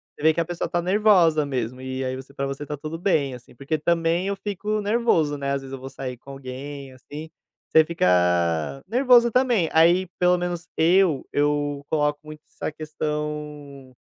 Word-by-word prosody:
Você - - -14
vê 160 +1 +5
que - - -1
a - - -2
pessoa 175 0 -4
tá 175 - 0
nervosa 180 -5 +4
mesmo, 130 -3 -3
e 130 0 -4
aí 130 0 -2
você 130 +1 -10
para 140 - -2
você 135 +1 -5
está 145 0 -5
tudo 155 +3 -6
bem, 155 -8 +1
assim, 125 0 -13
porque 140 +5 -2
também 170 +3 +1
eu 200 - -1
fico 210 +2 -3
nervoso, 205 -9 +1
né, 140 0 -2
às 140 - -2
vezes 135 0 -9
eu 135 - -6
vou 135 +1 -8
sair 130 -1 -6
com 135 - -16
alguém, 135 +1 -8
assim, 145 +5 -10 0.4
você 160 - +6
fica 170 - -1 0.8
nervoso 240 +1 +5
também, 240 -9 +2
aí 170 +3 +5
pelo 180 0 +4
menos 175 -1 -4
eu 170 -3 +3
eu 145 -1 0
coloco 150 -1 +1
muito 155 0 -11
essa - - -5
questão, 150 -3 -5
150 Hz, 185 wpm, -24 LUFS, 140-175 Hz, 0.8 s, você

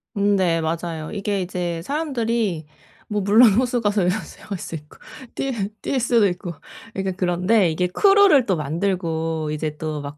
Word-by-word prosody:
음 200 0 +2
네, 170 -4 +1
맞아요. 160 -1 -3
이게 200 -1 -2
이제 175 -2 -3
사람들이 235 - -1 0.4
뭐 210 -1 -1
물론 210 +3 +6
호수가서 230 -4 +1
이런 190 +4 +1
수영할 200 - -8
수 165 - -7
있고 150 -1 -11 0.4
뛰 270 - -2 0.3
뛸 270 - -1
수도 235 -3 +3
있고 180 -1 -4 0.4
이게 195 -1 -1
그런데 180 +2 +2
이게 180 +3 0
크루를 390 - +5
또 190 - +1
만들고 165 -1 -2
이제 150 0 -3
또 155 -1 -4
막 145 +1 -8
185 Hz, 305 characters per minute, -22 LUFS, 165-220 Hz, 0.4 s, 물론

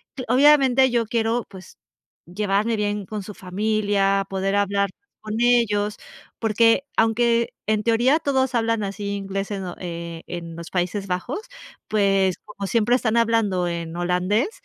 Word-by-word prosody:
cl 255 - -5
obviamente, 265 0 +5
yo 240 -2 +1
quiero, 230 +1 0
pues, 190 -2 -13 0.5
llevarme 205 +5 0
bien 205 -1 -2
con 210 0 -5
su 210 - -8
familia, 195 0 0
poder 195 +1 -1
hablar 200 0 +1 0.3
con 215 0 -5
ellos, 225 -4 +2 0.4
porque 230 +4 +3
aunque 230 +1 +2
en 215 -1 +1
teoría, 240 +7 +3
todos 265 -3 0
hablan 230 -2 +1
así 200 +1 -4
inglés, 195 0 -4
en 195 -1 -3
lo 180 -1 -6
eh, 170 -2 -6
en 170 -1 -7
los 170 0 -8
Países 185 +2 -2
Bajos, 185 - -3 0.5
pues 195 -3 +2
como 200 -2 -7
siempre 230 +3 +2
están 235 -3 -1
hablando 225 -6 +2
en 170 -1 -5
holandés, 180 - 0
210 Hz, 150 wpm, -23 LUFS, 195-230 Hz, 0.5 s, obviamente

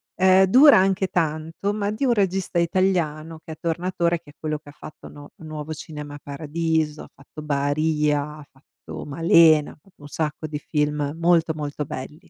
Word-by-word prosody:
Ehm, 190 +1 +5
dura 265 +8 +7
anche 190 0 +2
tanto, 165 +3 -2
ma 205 -1 -2
di 220 +6 -2
un 245 - +3
regista 190 -4 0
italiano 165 -3 0
che 160 - -8
è - - -10
Tornatore, 170 0 -1
che 145 - -16
è - - -26
quello 155 -1 -3
che 145 -1 -14
fatto 150 - -12
No 145 0 -13
"Nuovo 155 -1 -7
cinema 150 -1 -8
paradiso", 155 +1 -2
ha - - -14
fatto 140 +3 -12
"Baarìa", 150 +1 0 0.2
ha 145 - -13
fatto 135 +1 -12
"Malena", 160 0 +4
ha - - -17
fatto 195 -6 -25
un - - -9
sacco 155 +1 -4
di 150 -1 -5
film 150 -1 -1
molto, 165 -1 +3
molto 150 -1 -4
belli. 150 +7 -9
155 Hz, 175 wpm, -23 LUFS, 150-175 Hz, 0.2 s, dura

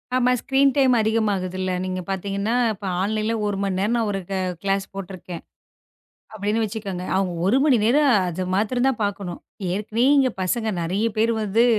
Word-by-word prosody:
ஆமா. 250 0 +3
Screen 270 0 +3
time 265 -3 +4
அதிகமாகுதுல்ல. 195 -4 0
நீங்கப் 185 0 -4
பாத்தீங்கன்னா, 200 +4 -1 0.2
இப்ப 200 0 -10 0.2
ஆன்லைன்ல 215 +3 0
1 205 -1 -1
மணி 195 -2 -1
நேரம் 210 +5 +1
நான் 225 -2 0
ஒரு 195 - -2
க - - -1 0.3
கிளாஸ் 195 0 0
போட்டுருக்கேன் 185 -3 -7 0.9
அப்படின்னு 210 +2 -1
வச்சுக்கோங்க. 200 -4 -4
அவங்க 190 -2 0
1 210 +7 +4
மணி 285 -5 +4
நேரம் 280 +5 +4 0.2
அத 180 +1 -3
மாத்திரம் 245 +6 +1
தான் 260 -3 0
பாக்கணும். 200 -3 -3 0.3
ஏற்கனவே 215 +5 0
இங்க 265 -2 +4
பசங்க 220 +5 0
நிறைய 190 +6 0
பேர் 225 +2 +3
வந்து 215 +2 +2
205 Hz, 165 wpm, -23 LUFS, 190-230 Hz, 0.9 s, time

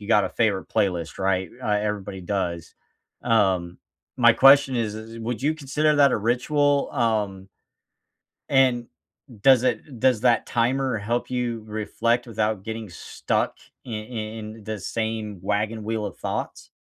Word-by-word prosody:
you 105 - -10
got 105 -3 +4
a - - -3
favorite 105 -5 0
playlist. 90 -7 -1
Right? 95 -2 0
Uh, - - -3
everybody 100 -2 -4
does. 90 -3 -3 0.5
Um, 95 -7 +1 0.4
my - - +6
question 135 0 +6
is 110 -3 -1
is 110 +1 -9
would 115 0 -4
you 150 +3 +2
consider 150 +1 +1
that 140 -1 +6
a - - +2
ritual? 140 +6 +1
Um 105 -6 -1 1.0
and 130 -3 +3 0.5
does 130 +2 +6
it 125 +1 -2
does 125 -3 +3
that 120 -1 +3
timer 130 +1 0
help 115 +4 -2
you 120 -3 -2
reflect 115 +3 -1
without 110 -3 -1
getting 110 -1 -6
stuck 85 - -2 0.3
i - - -8
i - - -5
in 110 0 -6
the 110 0 -4
same 110 -1 -4
wagon 105 +3 -1
wheel 110 0 -2
of - - -8
thoughts? - - -4
110 Hz, 150 wpm, -24 LUFS, 105-125 Hz, 1.0 s, my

